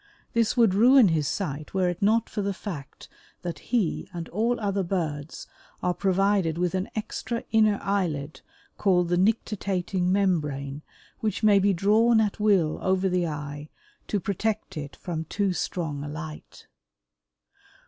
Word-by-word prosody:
This 230 Hz, +1 st, +1 dB
would 225 Hz, -5 st, +5 dB
ruin 240 Hz, +2 st, +6 dB
his 155 Hz, -3 st, +1 dB
sight 155 Hz, -2 st, -4 dB
were 185 Hz, -1 st, +2 dB
it 175 Hz, -1 st, -3 dB
not 220 Hz, +3 st, +3 dB
for 210 Hz, -, -3 dB
the 200 Hz, -1 st, -2 dB
fact 150 Hz, -9 st, -8 dB, 0.4 s
that 175 Hz, -1 st, -4 dB
he 230 Hz, -9 st, 0 dB
and 170 Hz, -2 st, -6 dB
all 230 Hz, +6 st, 0 dB
other 200 Hz, -2 st, 0 dB
birds 160 Hz, -5 st, -3 dB, 0.4 s
are 180 Hz, -, +2 dB
provided 195 Hz, -3 st, +1 dB
with 180 Hz, 0 st, 0 dB
an 185 Hz, +1 st, -2 dB
extra 225 Hz, +2 st, -3 dB
inner 215 Hz, -2 st, +4 dB
eyelid 160 Hz, -7 st, -2 dB, 0.4 s
called 180 Hz, -3 st, +3 dB
the 175 Hz, -, +2 dB
nictitating 190 Hz, -3 st, 0 dB
membrane 150 Hz, -8 st, 0 dB, 0.4 s
which 220 Hz, -1 st, -2 dB
may 205 Hz, -2 st, +6 dB
be 200 Hz, +1 st, +3 dB
drawn 215 Hz, +5 st, +4 dB
at 215 Hz, -1 st, 0 dB
will 195 Hz, -7 st, +2 dB
over 190 Hz, 0 st, +1 dB
the 180 Hz, -2 st, +1 dB
eye 145 Hz, 0 st, -6 dB, 0.4 s
to 205 Hz, -, 0 dB
protect 210 Hz, +3 st, -2 dB
it 145 Hz, -2 st, -6 dB
from 165 Hz, -3 st, -5 dB
too 195 Hz, +3 st, 0 dB
strong 160 Hz, -5 st, -3 dB
a -, -, -5 dB
light. 150 Hz, +1 st, -8 dB
190 Hz, 150 wpm, -26 LUFS, 160-205 Hz, 0.4 s, ruin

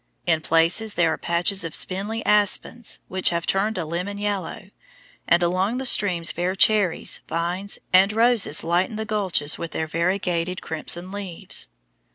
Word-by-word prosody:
In 160 Hz, -2 st, +2 dB
places 165 Hz, +7 st, +1 dB
there 165 Hz, -2 st, +2 dB
are -, -, -4 dB
patches 175 Hz, +3 st, 0 dB
of 165 Hz, -2 st, -5 dB
spindly 205 Hz, +4 st, -1 dB
aspens, 210 Hz, +3 st, +1 dB
which 185 Hz, 0 st, +2 dB
have 170 Hz, -1 st, -2 dB
turned 210 Hz, +3 st, 0 dB
a 170 Hz, -, -2 dB
lemon 180 Hz, +6 st, -4 dB
yellow, 200 Hz, -2 st, -4 dB, 0.6 s
and 175 Hz, 0 st, +4 dB
along 185 Hz, +7 st, 0 dB
the 265 Hz, -, -4 dB
streams 180 Hz, -8 st, +3 dB
bear 180 Hz, +2 st, -2 dB
cherries, 200 Hz, -3 st, +2 dB
vines, 175 Hz, +4 st, -2 dB, 0.2 s
and 190 Hz, +2 st, +6 dB
roses 225 Hz, -7 st, +2 dB
lighten 175 Hz, +5 st, 0 dB
the 220 Hz, +1 st, -4 dB
gulches 190 Hz, -9 st, 0 dB
with 165 Hz, -2 st, -6 dB
their 160 Hz, -, -2 dB
variegated 180 Hz, +1 st, -1 dB
crimson 175 Hz, +3 st, -2 dB
leaves. 190 Hz, -, -4 dB
185 Hz, 155 wpm, -23 LUFS, 170-205 Hz, 0.6 s, and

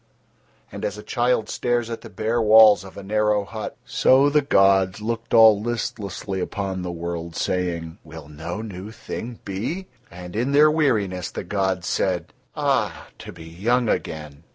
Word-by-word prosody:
And -, -, -8 dB
as 105 Hz, 0 st, -2 dB
a 105 Hz, -, -9 dB
child 120 Hz, -3 st, 0 dB
stares 120 Hz, 0 st, -1 dB
at 115 Hz, -, -5 dB
the 115 Hz, -, -11 dB
bare 110 Hz, +4 st, -1 dB
walls 110 Hz, -3 st, +7 dB
of 95 Hz, -, -13 dB
a 100 Hz, -, -7 dB
narrow 105 Hz, 0 st, +1 dB
hut, 110 Hz, +1 st, -7 dB
so 135 Hz, +2 st, +4 dB
the 150 Hz, 0 st, +4 dB
gods 95 Hz, -7 st, +3 dB
looked 115 Hz, +1 st, -4 dB
all 110 Hz, -2 st, +7 dB
listlessly 105 Hz, -4 st, -4 dB
upon 95 Hz, 0 st, -3 dB
the 90 Hz, -1 st, -4 dB
worlds, 85 Hz, -1 st, -5 dB
saying: 85 Hz, -3 st, -2 dB
"Will 80 Hz, -2 st, -11 dB
no 85 Hz, +7 st, -6 dB
new 100 Hz, -2 st, -8 dB
thing 115 Hz, +1 st, -7 dB
be?" 115 Hz, -, -4 dB, 0.2 s
And 90 Hz, +1 st, -10 dB
in 125 Hz, +5 st, 0 dB
Their 150 Hz, +2 st, +6 dB
weariness 105 Hz, -, 0 dB
the -, -, -6 dB
gods 95 Hz, -1 st, -1 dB
said: 90 Hz, -2 st, -1 dB, 0.2 s
"Ah! -, -, -1 dB
to -, -, -9 dB
be 85 Hz, -1 st, -12 dB
young 110 Hz, +9 st, 0 dB
again. 75 Hz, -1 st, -4 dB
100 Hz, 165 wpm, -23 LUFS, 90-115 Hz, 0.2 s, walls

